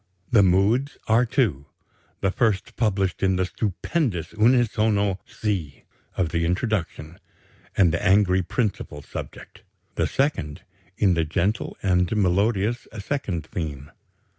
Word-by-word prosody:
The 115 -5 +6
moods 100 +9 +2
are 115 +3 +4
two; 95 - 0 0.5
the 95 - +1
first 110 -2 +1
is - - -21
published 100 -5 0
in 95 -1 +2
the 95 0 +1
stupendous 100 - -2
unisono 110 -4 +2
C 90 - -3 0.3
of 90 -4 +1
the 85 +1 -1
introduction 90 -3 -2 0.6
and 85 -5 +4
the - - -1
angry 95 -1 +4
principal 90 -7 -3
subject; - - -9 0.3
the - - 0
second, 135 - -1 0.3
in 95 -3 +3
the 85 -1 +1
gentle 90 +7 -1
and 90 -2 +2
melodious 100 +4 +1
second 100 - -3
theme. 75 -4 -6
95 Hz, 125 wpm, -24 LUFS, 85-110 Hz, 0.6 s, The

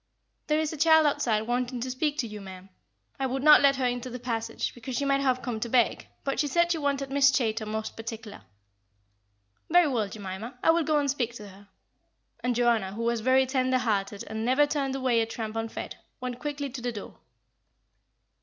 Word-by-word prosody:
"There 305 0 +2
is 315 0 -1
a - - -6
child 320 +1 +5
outside 225 -7 +1
wanting 245 +2 -2
to 255 +1 -3
speak 290 +3 -1
to 240 - -1
you, 210 -1 -8
ma'am. 190 0 -11 0.5
I 265 - 0
would 260 +1 -3
not 300 0 +8
let 280 -1 +5
her 260 -1 -1
into 245 0 -2
the 250 - -6
passage, 230 -2 -3
because 240 +1 -6
she 280 - 0
might 275 0 +2
have 255 -2 +1
come 240 -3 -3
to 235 - -3
beg; 240 -1 +2 0.2
but 275 -1 -2
she 295 - +2
said 340 +4 +2
she 330 - 0
wanted 280 -2 -1
Miss 275 0 +5
Chaytor 225 -5 0
most 220 0 -4
particular." 225 -1 -8 1.3
"Very 350 0 +5
well, 230 -7 -1
Jemima, 205 +4 -7
I - - +6
will 335 +1 +2
go 310 -1 +1
and 290 -1 +1
speak 240 -4 -2
to 210 -3 -9
her;" 195 +1 -16 0.7
and 245 +1 -1
Joanna, 230 -5 +2
who 230 +3 -4
was 235 -1 0
very 260 +3 +4
tender 260 -1 +1
hearted 205 -4 -1
and 220 +1 -4
never 260 +5 +4
turned 280 -2 -2
away 255 -3 +2
a 225 - -1
tramp 225 -1 -5
unfed, 225 0 -5 0.2
went 250 -1 -5
quickly 285 0 -4
to 255 0 -7
the 245 0 -2
door. 210 -3 -9
250 Hz, 210 wpm, -27 LUFS, 225-275 Hz, 1.3 s, not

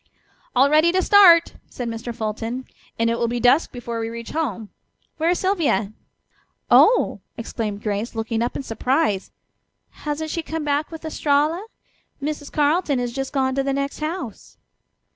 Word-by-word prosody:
"All 265 +3 +6
ready 310 +3 +4
to 375 - +3
start!" 355 -5 +6
said 245 - -5
Mr. 230 +1 -5
Fulton, 225 +2 -4 0.3
"and 230 - +1
it 230 - -1
will 235 - +1
be 240 +1 -2
dusk 250 +7 +3
before 235 -2 -5
we 225 0 -3
reach 230 0 -7
home. 235 -10 -3 0.5
Where 325 +1 +1
is 355 - +2
Sylvia?" 300 - 0 0.8
"Oh!" 485 - +5 0.2
exclaimed 215 -3 -4
Grace, 210 +2 -2
looking 225 0 -2
up 240 - -1
in - - -4
surprise. 250 -3 0 0.6
"Hasn't 300 +1 -4
she 335 - -2
come 320 0 -4
back 295 +1 0
with 325 -1 -9
Estralla? 305 +3 +1 0.6
Mrs. 295 0 -4
Carleton 300 0 +2
has 245 -1 -2
just 270 +1 -3
gone 265 -2 +1
to 275 - +1
the 275 0 -1
next 275 0 -3
house." 310 - -6
270 Hz, 160 wpm, -22 LUFS, 230-315 Hz, 0.8 s, All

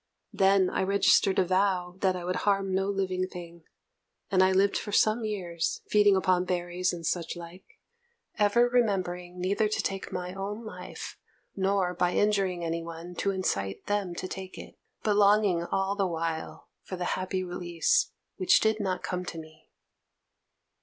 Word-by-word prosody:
Then 195 -1 +4
I - - 0
registered 195 0 +3
a 185 - +4
vow 185 -1 +1
that 190 -1 +2
I 180 - -5
would 180 +1 -1
harm 195 -2 +1
no 195 +1 +1
living 185 -2 -1
thing, 170 -2 -10 0.7
and 185 -1 +4
I 185 0 +5
lived 195 +1 +3
for 205 - -3
some 215 +3 +3
years, 180 -6 -2
feeding 205 -1 +5
upon 185 -1 +2
berries 180 0 -1
and 170 -2 -6
such 170 +1 -1
like, 175 - -12 0.6
ever 215 +4 +4
remembering 185 -7 -1
neither 200 +4 +1
to 215 - -2
take 195 -1 -3
my 180 0 -4
own 205 +4 -5
life, 220 - -8 0.4
nor 190 -2 +1
by 180 0 0
injuring 195 -4 +1
any 165 0 -2
one 170 +1 -8
to 200 - 0
incite 100 - -2
them 205 -4 -1
to 185 - -4
take 190 0 -7
it, - - -11 0.2
but 210 -2 +2
longing 200 -4 +4
all 195 +2 -1
the 200 -2 +1
while 165 -1 -4
for 185 - -7
the 180 -1 -3
happy 185 0 -2
release, 175 -2 +1 0.3
which 185 - +5
did 220 0 +1
not 190 -3 -2
come 180 -1 -3
to 170 - -6
me. 155 0 -12
185 Hz, 165 wpm, -28 LUFS, 175-200 Hz, 0.7 s, I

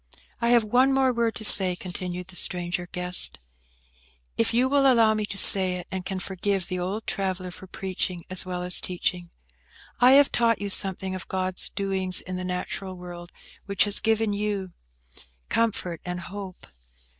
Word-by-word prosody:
"I 235 - +1
have 240 -1 +4
one 250 +5 +2
more 265 -1 +1
word 230 -1 -1
to 215 - -2
say," 185 -3 +7
continued 180 0 -7
the 185 - -12
stranger 175 0 -1
guest, 180 - +1 1.0
"if 230 0 0
you 245 +3 +2
will 275 0 +3
allow 225 -3 +3
me 215 -1 -3
to 200 - -6
say 185 -1 +7
it, 180 - -7
and 190 -1 -5
can 190 0 -5
forgive 190 0 -3
the 185 -1 -4
old 195 +5 -5
traveller 185 -2 -4
for 190 - -13
preaching 185 -1 -4
as 185 0 +1
well 180 -1 -6
as 180 0 +2
teaching. 180 -1 -3 0.7
I 250 +2 +6
have 280 0 +5
taught 230 -2 +1
you 200 0 -4
something 190 0 +3
of 185 - -7
God's 185 0 -3
doings 190 -2 0
in 185 - -7
the 185 - -5
natural 185 +1 -5
world, 175 -1 -11 0.4
which 200 -1 +2
has 205 -1 +4
given 220 -1 0
you 200 -2 -4 0.8
comfort 195 -7 -2
and 180 0 -5
hope. 190 0 -10
190 Hz, 175 wpm, -24 LUFS, 180-215 Hz, 1.0 s, say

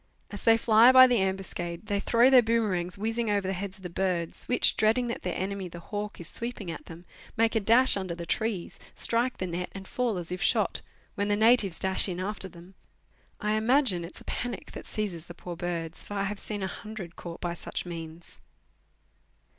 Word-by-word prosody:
As 205 - -6
they 225 0 +6
fly 230 +2 +6
by 260 0 +10
the 245 -5 +2
ambuscade, 190 -2 -3
they 205 -2 -1
throw 235 +5 +4
their 255 -2 +8
boomerangs 205 -6 0
whizzing 225 +2 -1
over 200 -2 0
the 190 - -1
heads 190 +1 -5
of 190 - -18
the 180 - -5
birds, 175 -2 -1
which, 250 - +2
dreading 230 +3 +2
that 235 - -4
their 180 -2 -3
enemy, 195 0 -3
the 175 - -10
hawk, 205 +3 -6
is 170 - -5
sweeping 230 -6 -2
at - - -9
them, 170 +1 -11 0.3
make 225 0 +3
a - - +4
dash 235 +5 +5
under 190 -3 -3
the 170 0 -7
trees, 215 0 -2 0.2
strike 240 +2 +1
the 185 - -2
net, 180 0 -4
and 195 -1 -9
fall 240 -5 -1
as 175 0 -6
if 180 +1 -4
shot, - - +2 0.3
when 205 -1 -1
the 205 - +2
natives 220 -4 +4
dash 190 +1 +3
in 180 -1 -4
after 195 0 -3
them. 175 +1 -15 0.7
I 210 0 0
imagine 220 -4 +3
it 170 - -9
is - - -11
a - - -15
panic 240 -5 -4
that - - -9
seizes 180 -6 -4
the 175 - -10
poor 175 0 -7
birds, 170 -1 -3
for 205 - -8
I 200 - 0
have 200 +1 -3
seen 205 -2 -3
a - - -1
hundred 190 -3 -8
caught 170 -1 -8
by 175 -1 -3
such 170 - -5
means. 165 -1 -9
195 Hz, 215 wpm, -28 LUFS, 175-225 Hz, 0.7 s, by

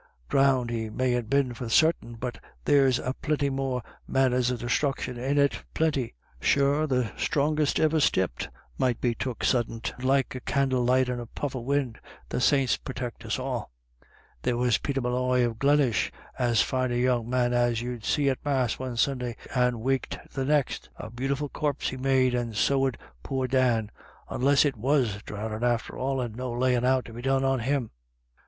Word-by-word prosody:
Dhrownded 130 -3 +3
he 110 -2 -2
mayn't 125 0 0
be 140 +1 +4
for 120 0 -6
sartin, 155 -4 +2
but 120 +1 -5 0.3
there's 135 -3 +4 0.2
plinty 145 -2 0
more 135 -2 -2 0.2
manners 125 -2 +2
of 125 -2 -2
desthruction 125 +1 -1
in 135 +4 -1
it 140 0 +2
— - - -37
plinty. 145 - 0 0.2
Sure 140 - +2
the 125 -6 0
strongest 150 +1 +1
iver 155 0 +3
stepped 95 - +1 0.3
might 125 -2 +1
be 120 -2 +1
took 125 0 -4
suddint, 115 -2 0
like 135 0 +2
a 130 - -5
candle 130 -1 +1
light 130 +1 +3
in 125 -1 -2
a 120 - -7
puff 145 +4 -4
of 125 -3 -5
win' 135 -4 0 0.2
— 65 -1 -24
the - - -2
saints 135 -1 +3
purtect 125 -2 -6
us 110 - -1
all. 130 -3 -3 0.7
There 125 -1 0
was 120 -3 +2
Peter 135 -1 -2
Molloy 125 0 +1
of 115 -2 -4
Glenish, 140 -6 +3 0.3
as 120 -3 +3
fine 130 -1 -1
a - - 0
young 120 -2 +1
man 125 -1 +1
as 120 -1 +2
you'd 120 -2 -5
see, 145 +4 +1
at 135 -2 0
Mass 130 -5 0
one 130 -2 -4
Sunday, 125 -2 0 0.2
and 125 -2 +1
waked 135 +2 -1 0.2
the 135 -1 -2
next 145 -2 0
A 110 - -8
beautiful 135 +4 -2
corp 145 0 -2
he - - -1
made, 130 -1 +2
and 120 -3 -2
so 135 +3 +3
'ud 130 - -4 0.2
poor 130 - -2
Dan 120 -4 +2 0.2
— - - -27
onless 140 +4 +3
it 140 -4 0
was 120 -4 +1
dhrownin' 110 +1 -4
after 120 -2 0
all, 135 +1 -1
and 120 -4 -3
no 125 0 -4
layin' 125 0 +1
out 130 0 +2
to 115 - -10
be 120 - -7
done 135 +1 +1
on 135 -1 +2
him." 130 0 -1
125 Hz, 190 wpm, -27 LUFS, 120-135 Hz, 0.7 s, be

